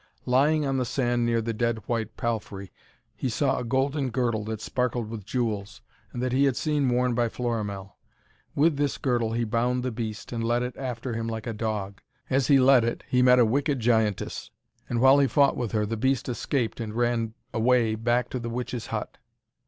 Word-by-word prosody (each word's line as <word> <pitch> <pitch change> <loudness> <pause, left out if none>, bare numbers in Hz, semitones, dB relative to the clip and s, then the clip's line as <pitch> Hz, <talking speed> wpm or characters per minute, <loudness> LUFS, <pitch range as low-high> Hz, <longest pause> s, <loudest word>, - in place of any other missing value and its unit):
Lying 145 +4 +3
on 135 -1 0
the 130 - +1
sand 120 -1 0
near 115 -1 +1
the 115 0 -2
dead 115 +1 0
white 115 -2 -2
palfrey, 105 -4 -4 0.4
he 130 - -2
saw 135 +3 +1
a - - -3
golden 135 +3 0
girdle 115 -3 0
that 110 -1 -4
sparkled 120 0 -2
with 110 -3 -6
jewels, 105 - -3 0.3
and 120 - -4
that 130 - 0
he 135 +3 +3
had 135 -3 +2
seen 150 -4 +1
worn 125 0 +1
by 120 0 +1
Florimell. 105 -5 -4 0.6
With 150 0 +3
this 145 -1 0
girdle 120 -5 0
he 120 +1 0
bound 120 +3 0
the 130 - -1
beast, 110 -2 -5
and 115 -1 -3
led 120 +1 +1
it 125 0 -4
after 125 -2 -4
him 115 0 -3
like 110 -1 -4
a 115 - -3
dog. 105 -3 -4 0.3
As 135 0 +2
he 140 -2 +6
led 130 -2 +6
it, 115 0 -2
he 125 - +3
met 125 0 +6
a 120 - +6
wicked 140 +4 0
giantess, 110 -3 0 0.4
and 120 -1 0
while 135 +2 +7
he 140 - +4
fought 140 0 +3
with 120 -4 -3
her 105 -1 +1
the 115 +2 -3
beast 130 +3 0
escaped 125 -1 -2
and 110 -2 -5
ran 120 -2 0 0.2
away 115 -1 +3
back 120 +2 0
to 130 - -2
the 120 0 -5
witch's 120 0 -4
hut. - - -5
120 Hz, 205 wpm, -26 LUFS, 115-130 Hz, 0.6 s, while